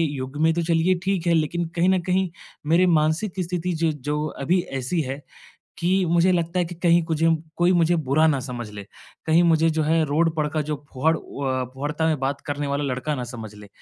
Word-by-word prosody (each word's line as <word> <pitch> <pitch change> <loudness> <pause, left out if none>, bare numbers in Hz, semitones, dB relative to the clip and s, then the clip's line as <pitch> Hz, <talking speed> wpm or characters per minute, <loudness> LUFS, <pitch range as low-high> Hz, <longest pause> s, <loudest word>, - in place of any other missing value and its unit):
युग 130 +2 -6
में 160 0 +4
तो 170 - -1
चलिए 170 +2 +2
ठीक 190 -3 -1
है 170 - +4
लेकिन 165 +2 0
कहीं 175 +2 +3
न 190 -1 +3
कहीं 185 +1 0 0.4
मेरे 170 +3 +4
मानसिक 160 +4 +1
स्थिति 180 0 -2
जो 160 - +3 0.2
जो 150 +1 0 0.2
अभी 180 +6 +2 0.2
ऐसी 155 +7 -1
है 135 +1 -5 0.6
कि 185 +2 +2
मुझे 175 +2 +3
लगता 170 +1 0
है 180 - +2
कि 175 +1 -7
कहीं 170 0 +3
कुजम 165 0 +2 0.2
कोई 175 +1 +3
मुझे 175 -1 +3
बुरा 155 +1 +2
ना 140 -4 +2
समझ 120 -4 -6
ले। 100 -1 -8 0.4
कहीं 160 +2 +4
मुझे 165 -1 +4
जो 155 0 0
है 160 +1 +2
रोड 160 +3 +1
पर 150 -1 0
का 155 0 -1
जो 145 -1 -4
वॉड 160 +5 +2
अ, 130 -2 -4
वॉड़ता 150 +3 -1
में 155 -3 +1
बात 135 +1 -2
करने 145 0 -2
वाला 140 +1 -1
लड़का 130 +3 -2
ना 125 -3 -4
समझ 110 -3 -8
ले। 105 -1 -13
160 Hz, 215 wpm, -23 LUFS, 145-170 Hz, 0.6 s, में